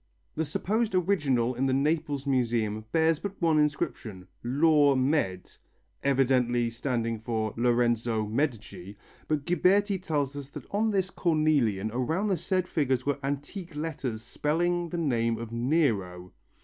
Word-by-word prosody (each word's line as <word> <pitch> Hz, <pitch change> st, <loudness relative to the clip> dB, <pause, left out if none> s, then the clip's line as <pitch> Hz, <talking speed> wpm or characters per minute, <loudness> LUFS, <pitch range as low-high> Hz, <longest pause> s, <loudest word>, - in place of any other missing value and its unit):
The 160 Hz, -, -1 dB
supposed 215 Hz, +8 st, -1 dB
original 145 Hz, -10 st, +1 dB
in 130 Hz, +2 st, 0 dB
the 130 Hz, -, +1 dB
Naples 145 Hz, -1 st, 0 dB
Museum 115 Hz, -5 st, 0 dB
bears 160 Hz, -1 st, +3 dB
but 200 Hz, -1 st, -6 dB
one 160 Hz, -3 st, +3 dB
inscription, 110 Hz, -10 st, -2 dB, 0.2 s
"LAVR 145 Hz, +2 st, +4 dB
MED.," 130 Hz, -10 st, 0 dB, 0.5 s
evidently 125 Hz, -3 st, +2 dB
standing 115 Hz, -2 st, -2 dB
for 110 Hz, -1 st, -2 dB
Lorenzo 120 Hz, -2 st, +1 dB
Medici, 105 Hz, -, -3 dB, 0.3 s
but 150 Hz, -2 st, -1 dB
Ghiberti 190 Hz, +3 st, +2 dB
tells 145 Hz, -5 st, -1 dB
us 140 Hz, -1 st, -7 dB
that -, -, -9 dB
on 215 Hz, +2 st, +1 dB
this 190 Hz, -2 st, 0 dB
cornelian 145 Hz, -, +1 dB
"around 160 Hz, -, 0 dB
the 190 Hz, -, +1 dB
said 185 Hz, +1 st, -1 dB
figures 130 Hz, -5 st, 0 dB
were 145 Hz, 0 st, 0 dB
antique 145 Hz, +5 st, -5 dB
letters 140 Hz, -8 st, -4 dB
spelling 170 Hz, +7 st, -1 dB
the 175 Hz, -, -4 dB
name 115 Hz, -8 st, 0 dB
of 115 Hz, -1 st, -7 dB
Nero." 115 Hz, -, 0 dB
140 Hz, 135 wpm, -28 LUFS, 115-160 Hz, 0.5 s, LAVR